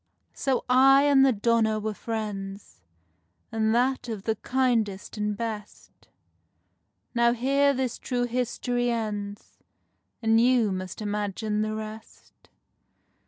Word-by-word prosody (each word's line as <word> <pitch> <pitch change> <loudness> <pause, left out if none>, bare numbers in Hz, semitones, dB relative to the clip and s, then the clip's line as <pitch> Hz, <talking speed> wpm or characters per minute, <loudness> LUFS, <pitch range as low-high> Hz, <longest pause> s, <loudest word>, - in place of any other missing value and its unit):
So 270 -2 -1
I 270 +2 +6
and 280 -2 +5
the 270 - +5
donna 220 -1 +1
were 215 0 -3
friends, 200 - -6 0.7
And 220 -1 +1
that 250 0 +1
of 215 -4 -5
the 220 - +1
kindest 230 -7 0
and 210 -1 -2
best; 215 -2 -7 1.1
Now 235 -1 +3
here 275 +4 +2
this 260 -3 -2
true 245 -2 -2
history 245 0 -1
ends, 210 -3 -4 0.6
And 225 0 +4
you 240 -4 +3
must 185 +2 -5
imagine 210 +1 -2
the 215 0 -2
rest. 215 0 -10
225 Hz, 120 wpm, -26 LUFS, 210-250 Hz, 1.1 s, I